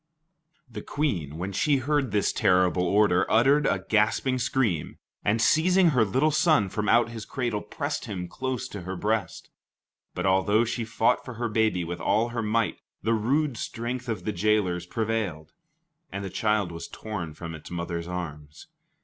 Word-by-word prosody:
The 120 - -7
Queen, 100 - -2
when 95 +3 -4
she 140 +9 +2
heard 140 0 0
this 105 0 +1
terrible 90 0 +3
order, 100 -2 +4
uttered 135 +6 +4
a - - 0
gasping 110 +4 +2
scream, 125 - 0 0.3
and 110 +3 +2
seizing 175 +8 +4
her 125 -7 +3
little 130 +10 +2
son 150 - +3
from 105 +2 -2
out 120 0 +4
his 115 -2 -7
cradle, 120 -3 -2
pressed - - -4
him 90 -3 -5
close 130 +5 -3
to 100 - -7
her 95 +2 -5
breast. 110 +4 -2 0.6
But 90 - -2
although 100 +4 +3
she 115 0 -3
fought 115 +2 +1
for 125 - -8
her 120 +1 -2
baby 110 -5 +1
with 85 +1 -5
all 110 +3 +2
her 120 0 -3
might, 110 0 0 0.2
the 115 +3 +2
rude 130 +4 +1
strength 120 +2 -4
of 110 - -3
the 105 - -1
jailers 90 -3 +1
prevailed, 100 -9 -2 0.6
and 100 +1 -4
the 95 - -6
child 105 -5 0
was 85 0 -7
torn 90 -8 -6
from 85 0 -7
its 80 -1 -10
mother's 85 -1 -4
arms. 75 -5 -7
110 Hz, 170 wpm, -26 LUFS, 90-120 Hz, 0.6 s, order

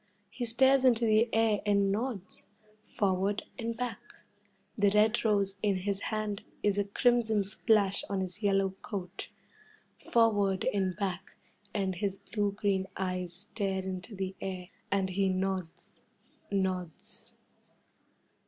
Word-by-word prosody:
He 245 - -3
stares 265 +3 +4
into 235 -3 +4
the 220 +1 +4
air 225 -2 +3
and 200 -1 +3
nods 215 -2 -3 0.5
forward 195 +1 +1 0.2
and 230 -1 -3
back. 245 -3 -3 0.8
The 205 -1 +4
red 215 +3 +3
rose 200 -3 +1
in 205 -2 +2
his 200 -1 0
hand 215 -2 -2 0.2
is 205 -1 +2
a 200 - +1
crimson 220 0 +2
splash 200 0 +2
on 200 -1 -1
his 185 +3 -5
yellow 195 -2 +2
coat. 195 -2 -6 0.8
Forward 205 -5 +3
and 190 -3 0
back, 190 -2 -4 0.4
and 195 -3 -1
his 195 0 -1
blue 205 -1 -1
green 195 -2 0
eyes 185 -2 -2
stare 195 0 -2
into 190 +3 -5
the 190 0 -3
air, 185 -1 -5 0.2
and 190 -1 +1
he 195 +1 +1
nods 185 -2 -3 0.5
nods. 185 -4 -3
200 Hz, 130 wpm, -31 LUFS, 190-215 Hz, 0.8 s, stares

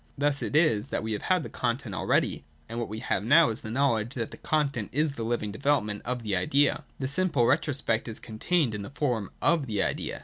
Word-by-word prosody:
Thus 145 0 +1
it - - -3
is 150 -10 +3
that - - -2
we 110 - -3
have 105 - -2
had 185 -3 +1
the - - -6
content 120 -3 -2
already, - - +1 0.2
and 115 - -6
I - - -1
what 120 - -3
we 110 +1 -5
have 95 - -1
now 150 +7 +6
is 110 - -3
the 110 - -7
knowledge 120 -1 +1
that 115 -4 -3
the - - -9
content 140 -8 -1
is 150 +3 +1
the 140 - -7
living 110 -2 -1
development 110 -5 0
of 125 -1 -3
the 105 -3 0
idea. 135 +11 +2
This 135 0 -2
simple 145 -6 +2
retrospect 135 -5 +1
is 115 - -6
contained 125 +4 0
in 105 - -4
the 100 - -7
form 125 -8 -1
of 165 -5 +3
the 105 -3 0
idea. - - -2
125 Hz, 235 wpm, -28 LUFS, 110-145 Hz, 0.2 s, now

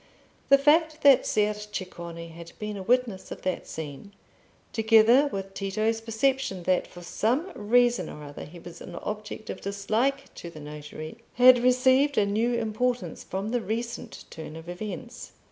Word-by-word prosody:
The 275 - +8
fact 305 +2 +3
that 280 -2 +6
Ser 210 0 +2
Ceccone 175 -5 -7
had 170 +1 -11
been 210 0 -4
a 195 - -5
witness 235 -2 0
of - - -7
that 185 -1 -2
scene, 160 +6 -7 0.6
together 225 +5 +5
with 195 -6 -5
Tito's 215 +3 -1
perception 225 -3 0
that 185 0 +1
for 175 - -12
some 250 - 0
reason 240 +3 +2
or 150 - -9
other 145 0 -8
he 170 +4 -12
was 170 0 -11
an 175 - -9
object 210 +3 -6
of - - -8
dislike 220 +8 -1
to 170 - -8
the 160 - -11
notary, 150 +4 -8 0.2
had 250 0 +8
received 260 +3 +4
a 210 - +4
new 225 +4 +1
importance 230 -4 -1
from 195 +3 -4
the 245 +1 0
recent 230 +2 -5
turn 160 -1 -8
of 165 +1 -10
events. 215 +6 -7
215 Hz, 160 wpm, -27 LUFS, 180-245 Hz, 0.6 s, The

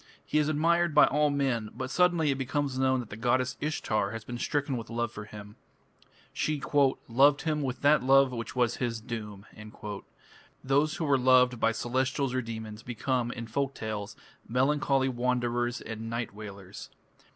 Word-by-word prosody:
He 150 - +1
is 150 0 +1
admired 170 +1 +2
by 150 - +8
all 150 +1 +2
men, 130 -6 0
but 130 +1 -5
suddenly 175 -4 +3
it 135 - -1
becomes 135 0 -2
known 130 -1 +2
that 115 - -12
the - - -5
goddess 125 +3 0
Ishtar 110 -9 -1
has 115 +1 -6
been 120 +2 -6
stricken 145 -1 -1
with 115 -3 -6
love 120 -1 -2
for 105 -2 -8
him. 105 0 -11 0.8
She 155 -1 -1 0.5
"loved 140 +5 +4
him 155 -2 0
with 130 -2 -3
that 150 +1 +5
love 135 0 +5
which 115 0 -6
was 120 -2 +1
his 120 -3 -2
doom". 105 -4 -7 1.2
Those 145 +3 +2
who 160 - -2
are 140 -2 +3
loved 125 -1 +4
by 115 - +3
celestials 130 +3 -1
or 130 - 0
demons 110 -2 -7
become, 120 +1 -2
in 120 -2 -6
folk 135 +4 -2
tales, 105 -2 -5 0.3
melancholy 135 +2 +2
wanderers 120 -1 -1
and 110 0 -6
"night 115 -1 -3
wailers". 100 -2 -9
125 Hz, 170 wpm, -29 LUFS, 115-140 Hz, 1.2 s, by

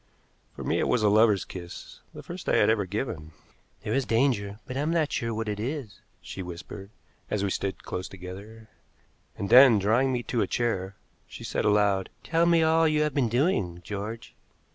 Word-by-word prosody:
For - - -7
me - - 0
it - - +1
was 125 -3 +1
a 105 - +5
lover's 105 -2 +4
kiss, 85 -2 -9
the - - -10
first - - -6
I - - +3
had - - +4
ever 105 -4 0
given. 90 -6 -4 0.5
"There 105 0 -2
is 135 - +1
danger, 115 -5 0
but 130 - -7
I - - -1
am 150 +2 0
not 165 -3 +1
sure 115 0 -2
what 110 0 -3
it 105 -1 -3
is," 125 -2 -5 0.2
she 95 - -7
whispered, 90 +2 -8 0.4
as 105 -2 -1
we 100 - 0
stood 95 0 -3
close 90 +1 -5
together. 100 +4 -10 0.7
And 100 - -4
then, 125 -3 +9
drawing 115 +7 +2
me 125 -1 -2
to 120 -1 -1
a - - +1
chair, 100 -5 -2 0.3
she - - -10
said - - -2
aloud: 100 -2 +2
"Tell 165 +1 +2
me 170 -1 +4
all 160 0 +4
you 155 -1 +2
have 150 -2 -1
been 130 -5 +1
doing, 115 - 0
George." 105 +3 -6
110 Hz, 200 wpm, -27 LUFS, 100-130 Hz, 0.7 s, then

